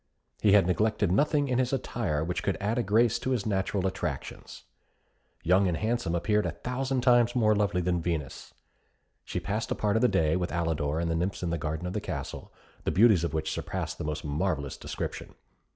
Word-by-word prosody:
He 105 -2 +5
had 100 -3 +6
neglected 105 +1 +1
nothing 145 +7 +2
in 125 -1 +1
his 130 -1 +1
attire 110 - -1
which 85 +2 -2
could 95 - -1
add 110 +4 0
a - - +3
grace 115 +2 +3
to - - -3
his 125 -6 0
natural 95 -2 0
attractions. 95 - -4 0.8
Young 95 +3 +4
and 85 -2 0
Handsome 110 -5 -1
appeared 105 +3 +1
a 85 - -3
thousand 130 +1 -1
times 120 -1 +4
more 110 -3 +4
lovely 100 -3 +1
than 90 -1 0
Venus. 80 -6 -4 0.7
She - - -3
passed 105 +3 -3
a - - 0
part 105 0 0
of 110 - +2
the 125 - +5
day 80 -8 +2
with 90 -1 -1
Alidor 80 -3 -1
and 85 0 -1
the - - 0
nymphs 90 +3 -2
in 85 - -1
the 85 - 0
garden 80 +3 -3
of 90 - -3
the - - -2
castle, - - -6 0.3
the - - 0
beauties 105 -4 +5
of 85 - -2
which 80 0 -1
surpassed - - -4
the - - -3
most 75 0 -4
marvellous 75 -2 -1
description. - - -6
95 Hz, 205 wpm, -28 LUFS, 85-115 Hz, 0.8 s, had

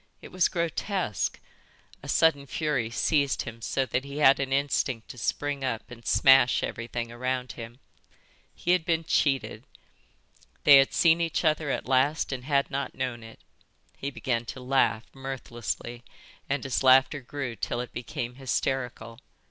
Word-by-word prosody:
It - - -12
was 185 -1 +3
grotesque. 170 - -2 0.6
A - - -9
sudden 145 -4 +3
fury 145 -7 -1
seized 140 +3 +1
him 115 0 -9
so 135 +3 -1
that 130 0 -2
he 140 +1 -8
had 140 -2 +5
an 135 -1 -2
instinct 135 -4 0
to - - -9
spring 145 +3 -2
up 125 -1 -3
and 120 -1 -11
smash 135 -2 +5
everything 115 0 -4
around 125 +1 -3
him. 115 0 -9 0.8
He 175 - -1
had 180 -2 +3
been 165 -1 0
cheated. 140 -4 0 1.0
They 145 -2 +9
had 135 0 +4
seen 165 0 +4
each 165 0 -1
other 155 -1 +1
at - - -2
last 135 +5 +1
and 130 -2 -5
had 140 -1 +1
not 140 +1 -3
known 125 -2 -3
it. 115 0 -13 0.5
He 140 - -4
began 120 -3 -2
to 130 - -7
laugh, 125 -3 +1
mirthlessly, 120 -3 -5 0.5
and 140 0 -1
his 135 -2 -1
laughter 130 +2 +5
grew 125 -1 -5
till 120 - -3
it 125 - -6
became 120 0 -5
hysterical. 125 -3 -3
135 Hz, 155 wpm, -27 LUFS, 120-145 Hz, 1.0 s, They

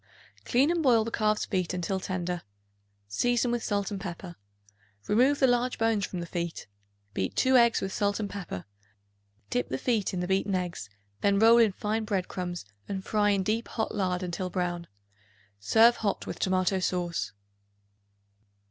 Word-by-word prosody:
Clean 270 +6 +3
and 345 -1 0
boil 240 -6 +4
the 230 - -4
calf's 215 -1 +1
feet 185 -2 -1
until 180 +2 -2
tender; 180 -1 -3 0.7
season 240 - +1
with 240 -1 -1
salt 200 -1 -1
and 195 -2 -4
pepper. 175 -1 -7 0.7
Remove 260 +7 +3
the 270 - +5
large 245 0 +1
bones 225 -3 +1
from 180 - -5
the - - -4
feet; 170 -1 -4 0.5
beat 95 - -2
2 260 0 +3
eggs 235 -2 +5
with 190 0 -3
salt 205 0 0
and 210 - -2
pepper; 190 - -6 0.9
dip 125 - 0
the 130 - -2
feet 225 - 0
in 185 - -3
the 180 - -2
beaten 195 +1 +1
eggs; 175 - -3 0.3
then 200 0 +2
roll 225 +3 +7
in 225 -3 +5
fine 215 +3 -2
bread 195 -4 -1
crumbs 175 - -5 0.2
and 190 -1 -4
fry 210 -1 +2
in 200 -2 +2
deep 220 +4 -1
hot 220 - -3
lard 185 -3 -1
until 180 +1 -3
brown. 175 -1 -2 0.7
Serve 225 - +5
hot 205 -3 -2
with - - -6
tomato 185 0 +1
sauce. 175 - -2
195 Hz, 170 wpm, -28 LUFS, 180-225 Hz, 0.9 s, roll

